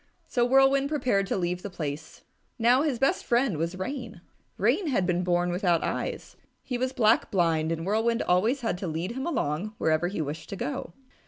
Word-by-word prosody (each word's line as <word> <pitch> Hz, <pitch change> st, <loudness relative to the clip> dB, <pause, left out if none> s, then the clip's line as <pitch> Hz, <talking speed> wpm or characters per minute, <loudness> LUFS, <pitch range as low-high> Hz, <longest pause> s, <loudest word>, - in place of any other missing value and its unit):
So 240 Hz, -, +1 dB
Whirlwind 270 Hz, +2 st, +4 dB
prepared 250 Hz, -10 st, +1 dB
to -, -, -1 dB
leave 180 Hz, 0 st, -2 dB
the 205 Hz, -, -6 dB
place. 155 Hz, -3 st, -6 dB, 0.3 s
Now 245 Hz, +3 st, +4 dB
his 290 Hz, -5 st, 0 dB
best 270 Hz, +3 st, +1 dB
friend 240 Hz, -, +1 dB
was 170 Hz, +3 st, -2 dB
Rain. 220 Hz, -2 st, -5 dB, 0.4 s
Rain 270 Hz, -, +2 dB
had 240 Hz, -10 st, +1 dB
been 180 Hz, 0 st, 0 dB
born 175 Hz, 0 st, +1 dB
without 175 Hz, -2 st, +1 dB
eyes. -, -, -4 dB, 0.3 s
He 250 Hz, -, -4 dB
was 255 Hz, +1 st, -1 dB
black 225 Hz, -3 st, +3 dB
blind, 165 Hz, -4 st, +1 dB
and 165 Hz, 0 st, -3 dB
Whirlwind 225 Hz, +4 st, +1 dB
always 220 Hz, +10 st, +2 dB
had 225 Hz, -6 st, -2 dB
to 190 Hz, -, -4 dB
lead 165 Hz, +4 st, -3 dB
him 265 Hz, +6 st, -4 dB
along 210 Hz, -, -2 dB
wherever 160 Hz, +2 st, +1 dB
he 190 Hz, -, -4 dB
wished 155 Hz, +1 st, -4 dB
to -, -, -4 dB
go. 165 Hz, 0 st, -4 dB
195 Hz, 190 wpm, -27 LUFS, 175-245 Hz, 0.4 s, Whirlwind